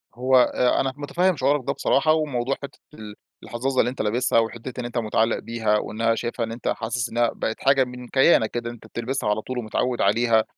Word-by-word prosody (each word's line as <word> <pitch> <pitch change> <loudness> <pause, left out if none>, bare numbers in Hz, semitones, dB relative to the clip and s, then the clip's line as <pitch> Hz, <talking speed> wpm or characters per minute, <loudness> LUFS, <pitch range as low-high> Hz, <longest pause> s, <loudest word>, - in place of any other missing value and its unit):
هو 130 +2 +1
أ 125 0 +3
أنا 135 -1 -1
متفهّم 175 +5 +1
شعورك 145 0 +1
ده 140 - +1
بصراحة، 145 +2 +2
وموضوع 135 -4 -1
حتِّة 140 +1 -9
ال 105 -6 -10 0.3
الحظّاظة 130 +2 -2
اللي 120 - +3
أنت 125 - -5
لابسها، 115 +2 +2
وحتِّة 115 +3 -4
إن 120 - -4
أنت 120 0 -5
مُتعلّق 115 0 +1
بيها، 110 -2 0
وإنها 115 +2 -1
شايفها 120 0 -3
إن 115 - -8
أنت 115 +1 -6
حاسس 115 +1 -2
إنها 120 0 +1
بقِت 110 - -4
حاجة 135 -1 +4
من 125 0 -8
كيانك 130 -4 +4
كده، 120 0 -3
ان - - -7
أنت 120 - -14
بتلبسها 120 -1 -3
على 105 +1 0
طول 130 +3 -6
ومتعوّد 120 +2 -1
عليها، 110 +2 +3
120 Hz, 210 wpm, -23 LUFS, 115-130 Hz, 0.3 s, حاجة